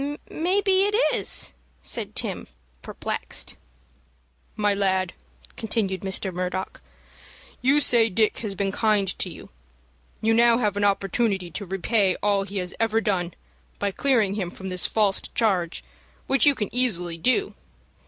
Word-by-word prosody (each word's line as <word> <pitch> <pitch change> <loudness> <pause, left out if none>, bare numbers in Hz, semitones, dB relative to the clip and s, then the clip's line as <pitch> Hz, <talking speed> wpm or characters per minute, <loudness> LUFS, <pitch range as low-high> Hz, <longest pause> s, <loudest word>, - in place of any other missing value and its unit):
"Maybe 380 +3 +2
it 415 +1 +1 0.2
is," 195 - 0 0.3
said 65 0 -4
Tim, - - -1 0.3
perplexed. - - -4 1.0
"My 210 -1 +2
lad," 190 -2 0 0.4
continued 205 -4 -1
Mr. 190 -1 0
Murdock, 180 +1 -4 0.8
"you 275 +4 +4
say 235 -5 +5
Dick 215 +2 +1
has 210 -4 -4
been 195 0 -1
kind 210 -1 +2
to - - -1
you. - - -11 0.7
You 225 0 +2
now 235 0 +5
have 210 -5 0
an 205 - -1
opportunity 195 -1 0
to 200 - -5
repay 195 +1 +1
all 205 -1 +2
he 200 +1 -6
has 180 -1 -3
ever 225 0 +2
done, 185 -6 -1 0.4
by 200 -1 -1
clearing 225 -4 +1
him 195 -4 -3
from 190 +2 -8
this 180 -1 +1
false 205 -3 +1
charge, 190 -7 0 0.4
which 270 -1 +3
you 285 - +5
can 210 -5 -3
easily 180 -9 +1
do." 255 - +2
205 Hz, 145 wpm, -24 LUFS, 190-230 Hz, 1.0 s, say